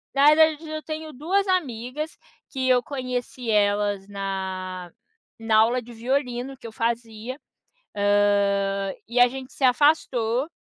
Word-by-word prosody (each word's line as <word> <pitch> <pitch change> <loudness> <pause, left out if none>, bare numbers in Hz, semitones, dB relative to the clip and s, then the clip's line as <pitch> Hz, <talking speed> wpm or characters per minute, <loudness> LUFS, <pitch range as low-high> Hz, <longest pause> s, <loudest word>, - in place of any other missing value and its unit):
na 280 +1 +5
realidade 315 0 +4
eu 310 0 -4
tenho 310 0 -6
2 375 +9 0
amigas 295 -3 -2 0.3
que 260 -1 -2
eu 250 -1 +5
conheci 250 -3 -4
elas 205 -1 +1
na 190 -2 -5 0.5
na 225 -1 +2
aula 235 +3 +4
de 240 0 -12
violino 250 +2 -2
que 235 - -10
eu - - -9
fazia, 230 +3 -3 0.6
hã, 200 -1 +2
e 240 +1 -1
a 245 - +9
gente 260 +1 -8
se 270 - -3
afastou, 255 -2 +2
245 Hz, 135 wpm, -24 LUFS, 205-275 Hz, 0.6 s, a